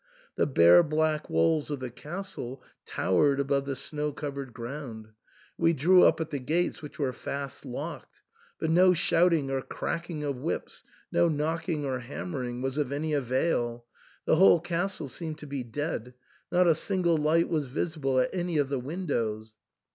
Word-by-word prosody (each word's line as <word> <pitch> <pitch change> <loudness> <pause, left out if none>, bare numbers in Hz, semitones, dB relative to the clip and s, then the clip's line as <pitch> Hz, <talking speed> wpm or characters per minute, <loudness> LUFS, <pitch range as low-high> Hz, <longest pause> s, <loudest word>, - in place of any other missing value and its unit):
The - - +2
bare 85 - +7
black 155 0 0
walls 145 - +2
of 145 -2 -3
the 130 -2 -5
castle 150 - -7 0.2
towered 140 +9 +2
above 140 0 +1
the 135 - -2
snow 150 +2 -3
covered 140 -3 -5
ground; 115 -2 -7 0.5
we 165 0 +4
drew 180 +6 +5
up - - +4
at 160 - -3
the 145 - -2
gates, 165 +7 0
which 150 - -10
were 135 -4 -1
fast 140 +3 -6
locked. 125 - -7 0.4
But 160 - 0
no 180 +2 +6
shouting 165 -4 +2
or 135 -1 0
cracking 170 +2 -4
of 140 -3 -2
whips, 145 +7 -4 0.3
no 170 - +3
knocking 155 0 -1
or 130 -2 -2
ham 130 +8 -6
mering, 125 -2 -4
was 135 +2 -1
of 140 -3 -1
any 150 +2 -2
avail; 125 -3 0 0.4
the - - +3
whole 180 -1 +7
castle 175 -1 -2
seemed 155 +2 -5
to 150 - -9
be 140 -3 -4
dead; 125 0 -4 0.4
not 180 +1 +4
a 165 - +6
single 175 0 +1
light 155 +2 +3
was 155 -5 -1
visible 135 -1 -1
at 125 - +1
any 175 -3 -1
of 145 -2 +1
the 140 -2 -1
windows. 120 - -3
145 Hz, 170 wpm, -28 LUFS, 130-165 Hz, 0.5 s, bare